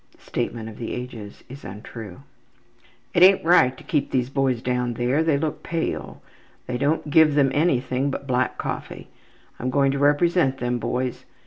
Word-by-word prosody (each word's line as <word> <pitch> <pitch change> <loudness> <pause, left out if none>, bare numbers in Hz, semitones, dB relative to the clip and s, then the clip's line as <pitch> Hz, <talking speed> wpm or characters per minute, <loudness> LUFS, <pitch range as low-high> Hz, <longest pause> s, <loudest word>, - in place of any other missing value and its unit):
'' - - -41
(The - - -27
statement 115 -1 -3
of 110 - -10
the 115 - -4
ages 115 -4 -8
is 135 +2 -11
untrue.) 105 0 -9 0.9
``It 175 - +2
ain't 190 -2 +6
right 130 -7 +4
to - - -13
keep 150 -5 -1
these 125 0 -1
boys 135 -3 +1
down 125 -1 -1
there. 125 +6 +1
They 160 -3 +2
look 155 +1 -3
pale. 165 -1 -4 0.4
They 125 -1 -3
don't 150 +1 0
give 155 -1 +5
them 140 -2 +3
anything 135 -3 +1
but 140 - -5
black 130 -1 0
coffee. - - -6 0.5
I'm 125 - -2
going 135 +1 +2
to 140 - -2
represent 145 0 +3
them 120 -1 -2
boys. 125 +1 -3
130 Hz, 180 wpm, -23 LUFS, 125-150 Hz, 0.9 s, ain't